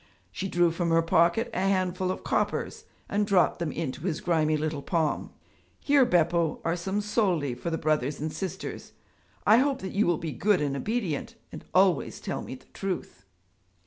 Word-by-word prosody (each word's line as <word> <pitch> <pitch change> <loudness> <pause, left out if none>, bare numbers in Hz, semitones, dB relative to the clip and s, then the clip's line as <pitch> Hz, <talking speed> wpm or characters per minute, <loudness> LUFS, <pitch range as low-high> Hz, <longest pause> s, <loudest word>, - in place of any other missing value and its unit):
She 195 - -4
drew 175 -2 +3
from 170 +1 -1
her 165 0 +4
pocket 170 +8 +2
a - - -1
handful 185 -1 0
of 185 - -3
coppers - - -1 0.2
and 205 0 0
dropped 190 -3 +3
them 170 -3 -2
into 155 -5 -4
his 165 -2 -2
grimy 155 -3 +1
little 155 -1 -2
palm. 160 -1 -1 0.5
'Here, 280 -2 +4
Beppo, 170 -5 +2
are 165 +1 +1
some 190 +4 -2
soldi 190 - 0
for 125 +8 -4
the 165 - -1
brothers 150 -3 0
and 155 +1 -3
sisters. 190 +1 -6 0.5
I 215 - +7
hope 275 +1 +2
that 190 - -5
you 200 0 +2
will 175 -2 +2
be 160 -1 -4
good 190 - +2
and 145 -2 -1
obedient 215 - -2 0.2
and - - -9
always 185 -4 +3
tell - - -4
me - - -7
the - - -17
truth.' 180 - -5
175 Hz, 180 wpm, -27 LUFS, 155-195 Hz, 0.5 s, I